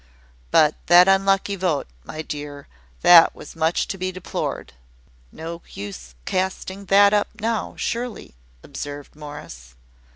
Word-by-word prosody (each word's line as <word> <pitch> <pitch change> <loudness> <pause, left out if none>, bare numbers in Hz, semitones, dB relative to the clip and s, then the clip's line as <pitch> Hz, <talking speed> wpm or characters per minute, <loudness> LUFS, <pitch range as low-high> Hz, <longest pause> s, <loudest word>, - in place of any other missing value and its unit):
But 155 - +5
that 175 +2 +8
unlucky 195 +1 +3
vote, 180 -6 -1 0.2
my 155 - -7
dear, 145 -2 -7 0.3
that 175 -2 +8
was - - -11
much 165 +1 0
to 195 - -4
be 185 0 -2
deplored." 185 - -5 0.6
"No 165 +1 -7
use 65 -12 -8
casting 190 +1 -3
that 200 +1 +5
up 205 -1 +2
now, 225 +1 -2
surely," 235 - -4 0.3
observed 145 0 -8
Morris. 145 - -10
175 Hz, 125 wpm, -22 LUFS, 145-195 Hz, 0.6 s, that